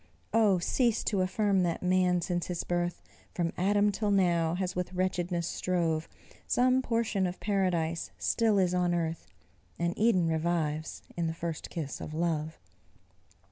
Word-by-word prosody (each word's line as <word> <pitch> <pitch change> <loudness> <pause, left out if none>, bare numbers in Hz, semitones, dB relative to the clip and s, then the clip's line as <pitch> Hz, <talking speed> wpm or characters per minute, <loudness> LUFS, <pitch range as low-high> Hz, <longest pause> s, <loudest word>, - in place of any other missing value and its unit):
Oh! 215 -4 +4
cease 230 +6 +1
to 200 -4 +1
affirm 195 +1 +2
that 175 -1 -1
man, 180 -1 +3
since 175 0 -2
his 180 -2 -3
birth, 175 0 -2 0.3
From 170 -2 -1
Adam 205 +3 +2
till 210 +1 -1
now, 170 -4 +2
has 180 -1 -2
with 180 0 -3
wretchedness 180 -2 -1
strove; 165 -3 -1 0.4
Some 255 +1 +3
portion 230 -6 0
of 180 - -6
paradise 175 -5 0
still 225 -3 +2
is 180 -2 +2
on 180 -1 +1
earth, 165 -1 -2 0.5
And 170 0 0
Eden 210 -6 +3
revives 160 -1 -1
in 170 -1 -1
the 160 - -3
first 165 -2 -5
kiss 155 -5 -5
of 155 - -6
love. 160 -1 -1
180 Hz, 150 wpm, -30 LUFS, 170-195 Hz, 0.5 s, Oh